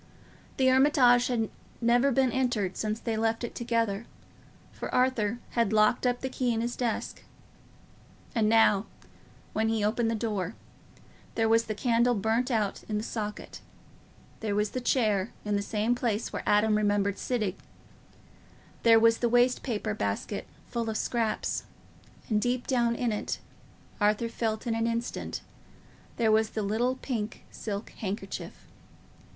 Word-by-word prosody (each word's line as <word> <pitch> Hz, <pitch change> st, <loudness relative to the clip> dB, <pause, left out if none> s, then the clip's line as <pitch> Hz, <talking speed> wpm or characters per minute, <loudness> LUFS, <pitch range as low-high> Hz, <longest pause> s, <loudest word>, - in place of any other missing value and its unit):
The 265 Hz, -, +2 dB
Hermitage 260 Hz, -2 st, +5 dB
had 230 Hz, -3 st, 0 dB, 0.3 s
never 245 Hz, +4 st, +3 dB
been 260 Hz, 0 st, +3 dB
entered 235 Hz, -8 st, 0 dB
since 215 Hz, 0 st, -2 dB
they 230 Hz, -2 st, -2 dB
left 225 Hz, +1 st, 0 dB
it 235 Hz, -, -4 dB
together, 230 Hz, -3 st, -1 dB, 0.6 s
for -, -, -6 dB
Arthur 245 Hz, -4 st, +2 dB
had 230 Hz, -4 st, +1 dB
locked 215 Hz, +3 st, +3 dB
up 245 Hz, 0 st, 0 dB
the 265 Hz, -, -2 dB
key 255 Hz, -1 st, 0 dB
in 225 Hz, -1 st, 0 dB
his 240 Hz, +1 st, -2 dB
desk. 240 Hz, -3 st, -2 dB, 1.1 s
And 220 Hz, -3 st, +2 dB
now, 225 Hz, -2 st, +4 dB, 0.7 s
when 220 Hz, +1 st, +1 dB
he 225 Hz, -2 st, 0 dB
opened 225 Hz, +2 st, +1 dB
the 230 Hz, -, 0 dB
door, 210 Hz, -3 st, -2 dB, 0.8 s
there 225 Hz, -1 st, +2 dB
was 225 Hz, +1 st, +4 dB
the 215 Hz, -, -3 dB
candle 240 Hz, +2 st, +2 dB
burnt 225 Hz, +5 st, +1 dB
out 215 Hz, -5 st, 0 dB
in 210 Hz, -, 0 dB
the 210 Hz, -, -2 dB
socket; 210 Hz, -2 st, -5 dB, 0.8 s
there 210 Hz, -2 st, -2 dB
was 210 Hz, 0 st, +1 dB
the 255 Hz, -, -3 dB
chair 215 Hz, -5 st, +1 dB
in 210 Hz, 0 st, 0 dB
the 200 Hz, -, +1 dB
same 215 Hz, +3 st, 0 dB
place 230 Hz, -3 st, -1 dB
where -, -, -2 dB
Adam 210 Hz, +1 st, +4 dB
remembered 205 Hz, -1 st, +1 dB
sitting; 215 Hz, -7 st, -1 dB, 1.2 s
there 230 Hz, -1 st, +7 dB
was 230 Hz, 0 st, +4 dB
the 240 Hz, -, +1 dB
waste 245 Hz, +1 st, +3 dB
paper 215 Hz, -3 st, -2 dB
basket 150 Hz, -, -3 dB, 0.2 s
full 230 Hz, -2 st, -1 dB
of 220 Hz, -, -1 dB
scraps, 230 Hz, -3 st, -1 dB, 0.6 s
and 215 Hz, -3 st, +1 dB
deep 245 Hz, +1 st, 0 dB
down 240 Hz, -3 st, +2 dB
in 240 Hz, -1 st, 0 dB
it, 210 Hz, -, -2 dB, 0.6 s
Arthur 210 Hz, +2 st, +2 dB
felt 220 Hz, -1 st, -2 dB
in 235 Hz, -, 0 dB
an 225 Hz, 0 st, 0 dB
instant, 235 Hz, +1 st, -3 dB, 0.8 s
there 225 Hz, -2 st, +3 dB
was 220 Hz, 0 st, +3 dB
the 215 Hz, -, -3 dB
little 235 Hz, +5 st, +1 dB
pink 225 Hz, -5 st, -4 dB
silk 205 Hz, 0 st, -5 dB
handkerchief. 195 Hz, -1 st, -5 dB
225 Hz, 155 wpm, -28 LUFS, 210-240 Hz, 1.2 s, there